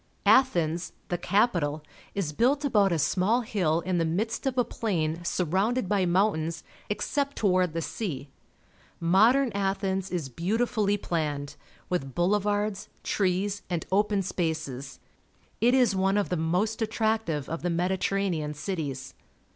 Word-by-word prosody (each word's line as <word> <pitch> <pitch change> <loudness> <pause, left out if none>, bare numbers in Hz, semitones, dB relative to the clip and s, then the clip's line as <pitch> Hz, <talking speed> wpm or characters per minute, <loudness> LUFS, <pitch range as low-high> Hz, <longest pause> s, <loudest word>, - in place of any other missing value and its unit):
— - - -38 0.2
Athens, 170 -9 -2 0.2
the 175 - 0
capital, 175 -9 +1 0.3
is 175 -7 -2
built 275 - +2
about 205 -8 +3
a 170 - +2
small 185 - +2
hill 180 -8 0
in 185 -1 -1
the - - +2
midst 210 +11 -1
of 260 -1 -1
a 245 - +4
plain 175 -8 -2
surrounded 190 +7 0
by 195 -2 +2
mountains 170 -3 +1 0.3
except 280 +6 -1
toward 185 -5 +2
the 165 0 -2
sea. 150 - -4 0.7
Modern 225 +10 +4
Athens 195 -1 -1
is 170 -6 -2
beautifully 205 - 0
planned, 150 -6 -3 0.3
with 135 -8 -3
boule 185 +4 +3
vards, 205 0 -1 0.2
trees, 195 +1 0
and 175 -3 -2
open 205 0 +2
spaces. 155 -7 -3 0.6
It 245 +3 +5
is 250 -6 +4
one 190 +1 +2
of 205 - 0
the 180 - 0
most 180 +8 0
attractive 220 -9 0
of 165 - -4
the 175 - -1
Mediterranean 180 -2 0
cities. 145 -5 -4
185 Hz, 140 wpm, -27 LUFS, 165-210 Hz, 0.7 s, It